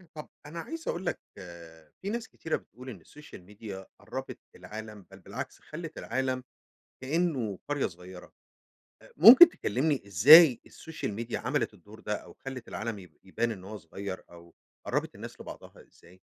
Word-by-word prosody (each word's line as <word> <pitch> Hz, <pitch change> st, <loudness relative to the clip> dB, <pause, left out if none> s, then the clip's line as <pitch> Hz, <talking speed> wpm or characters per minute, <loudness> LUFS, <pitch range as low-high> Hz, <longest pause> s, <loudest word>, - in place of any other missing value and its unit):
طب 150 Hz, -, -8 dB, 0.2 s
أنا 160 Hz, +3 st, -7 dB
عايز 325 Hz, -, -7 dB
أقول 180 Hz, +3 st, -2 dB
لك -, -, -1 dB, 0.8 s
في 195 Hz, -, -4 dB
ناس 230 Hz, +1 st, -3 dB
كتيرة 160 Hz, -, -3 dB
بتقول 125 Hz, +4 st, -10 dB
إن 100 Hz, -9 st, -9 dB
السوشيال 150 Hz, -, -14 dB
ميديا 100 Hz, 0 st, -9 dB
قربت -, -, -7 dB, 0.2 s
العالم، 110 Hz, -2 st, -9 dB
بل 95 Hz, -, -13 dB
بالعكس 115 Hz, +8 st, -7 dB
خلت 165 Hz, +1 st, -8 dB
العالم 130 Hz, +1 st, -2 dB, 0.6 s
كأنه 130 Hz, -, -1 dB
قرية 145 Hz, -2 st, 0 dB
صغيرة. 90 Hz, +1 st, -12 dB, 0.7 s
أ -, -, -17 dB
ممكن 240 Hz, -, +11 dB
تكلمني 140 Hz, -, -1 dB
إزاي 130 Hz, -, +8 dB
السوشيال 160 Hz, -9 st, -6 dB
ميديا 115 Hz, +3 st, -4 dB
عملت -, -, -1 dB
الدور -, -, -15 dB
ده -, -, -2 dB
أو -, -, -9 dB
خلت 135 Hz, -2 st, -6 dB
العالم 110 Hz, -1 st, -4 dB
يب 90 Hz, -4 st, -14 dB
يبان 115 Hz, +5 st, -1 dB
إنه 95 Hz, -2 st, -10 dB
هو 110 Hz, -, -6 dB
صغير 95 Hz, +2 st, -7 dB
أو 85 Hz, 0 st, -16 dB, 0.3 s
قربت -, -, -1 dB
الناس -, -, -10 dB
لبعضها -, -, -11 dB
إزاي؟ 90 Hz, +2 st, -21 dB
120 Hz, 160 wpm, -29 LUFS, 100-150 Hz, 0.8 s, ممكن